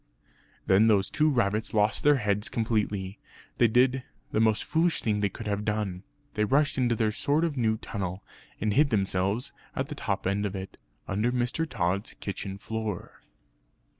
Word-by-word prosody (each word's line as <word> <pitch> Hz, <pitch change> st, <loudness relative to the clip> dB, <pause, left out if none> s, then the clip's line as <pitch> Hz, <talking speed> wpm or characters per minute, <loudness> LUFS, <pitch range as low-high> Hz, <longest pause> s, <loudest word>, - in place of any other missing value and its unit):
Then 100 Hz, +4 st, +5 dB
those 100 Hz, -3 st, +3 dB
two 155 Hz, 0 st, +3 dB
rabbits 110 Hz, -5 st, 0 dB
lost 105 Hz, 0 st, +2 dB
their 145 Hz, 0 st, +6 dB
heads 105 Hz, -4 st, 0 dB
completely. 105 Hz, -4 st, -1 dB, 0.4 s
They 120 Hz, -, +6 dB
did 125 Hz, +3 st, +3 dB, 0.3 s
the -, -, +1 dB
most 110 Hz, -1 st, +3 dB
foolish 165 Hz, +2 st, +1 dB
thing 105 Hz, -2 st, +1 dB
that -, -, -2 dB
they 100 Hz, -, +2 dB
could 110 Hz, -, -9 dB
have 105 Hz, 0 st, -1 dB
done. 105 Hz, -4 st, -2 dB, 0.3 s
They 105 Hz, -, +1 dB
rushed 145 Hz, +6 st, +2 dB
into 120 Hz, -3 st, +2 dB
their 110 Hz, -1 st, +1 dB
short 150 Hz, +7 st, 0 dB
new 110 Hz, -4 st, +1 dB
tunnel, 95 Hz, -3 st, -5 dB, 0.4 s
and 105 Hz, 0 st, 0 dB
hid 145 Hz, +4 st, +4 dB
themselves 100 Hz, +1 st, 0 dB, 0.2 s
at -, -, -2 dB
the -, -, -3 dB
top -, -, -3 dB
end 100 Hz, +2 st, 0 dB
of 100 Hz, -, -6 dB
it, 95 Hz, 0 st, -7 dB, 0.3 s
under 105 Hz, +5 st, 0 dB
Mr. 125 Hz, +6 st, -1 dB
Tod's 100 Hz, -1 st, -1 dB
kitchen 100 Hz, -1 st, -5 dB
floor. 110 Hz, -2 st, -5 dB
110 Hz, 170 wpm, -28 LUFS, 100-125 Hz, 0.4 s, their